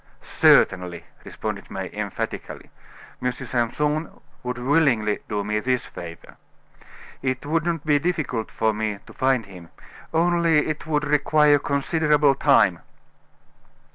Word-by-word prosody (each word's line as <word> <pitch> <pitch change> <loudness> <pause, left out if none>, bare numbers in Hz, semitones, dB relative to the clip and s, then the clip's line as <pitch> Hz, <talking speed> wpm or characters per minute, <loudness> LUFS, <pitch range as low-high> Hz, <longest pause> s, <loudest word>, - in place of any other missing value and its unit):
"Certainly," 90 -2 +3 0.2
responded - - -6
May, - - -5
emphatically. - - -5 0.5
"M. 125 - 0
Simpson 150 +7 -2 0.2
would 125 0 -4
willingly 125 -6 +2
do 105 -2 -1
me 105 +1 -1
this 125 +2 -1
favor. 85 -1 -10 0.8
It 130 0 -2
would 165 +2 0
not 165 -3 -2
be 145 -1 +3
difficult 145 -9 -2
for 110 -1 0
me 105 -1 -2
to - - -14
find 130 -4 +1
him, 90 -4 -13 0.4
only 170 -2 +2
it 155 +1 -4
would 150 -1 0
require 150 0 +4
considerable 150 0 +2
time." 135 - +3
140 Hz, 120 wpm, -23 LUFS, 110-150 Hz, 0.8 s, require